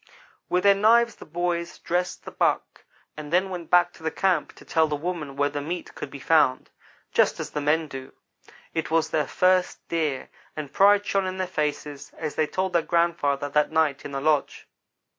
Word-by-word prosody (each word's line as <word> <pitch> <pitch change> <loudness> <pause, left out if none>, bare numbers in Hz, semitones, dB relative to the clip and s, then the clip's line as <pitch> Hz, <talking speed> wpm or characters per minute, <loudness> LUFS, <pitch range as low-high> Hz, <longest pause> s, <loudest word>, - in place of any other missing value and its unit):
With 180 0 +1
their 200 0 +7
knives 230 +4 +4
the - - -12
boys 170 +1 -2
dressed 180 +1 -2
the - - -7
buck, - - -1 0.3
and 150 -1 -8
then 185 +2 +2
went 175 -2 -6
back 175 0 +4
to - - -17
the 160 - -1
camp 185 -3 0
to - - -16
tell 160 -1 +2
the 150 - -2
women 150 -3 -4
where 145 +1 +2
the 145 0 -3
meat 170 +4 -5
could - - -7
be - - -9
found 140 -2 +2 0.4
just - - +2
as - - -5
the 150 - -3
men 155 +2 +1
do. 135 -2 -8 0.6
It 160 - -2
was 160 0 +1
their 150 -3 +1
first 185 0 +1
deer; 155 -6 -1 0.3
and 150 -3 -6
pride 205 +1 +5
shone 195 -2 0
in 185 0 -4
their 185 - -1
faces 150 -4 -4
as 155 -2 -4
they 155 - +1
told 185 +3 -2
their 170 - +4
grandfather 165 -5 +1
that 150 +2 +2
night 155 -3 +1
in 145 - -7
the 135 -1 -3
lodge. 150 -1 0
160 Hz, 200 wpm, -25 LUFS, 150-180 Hz, 0.6 s, their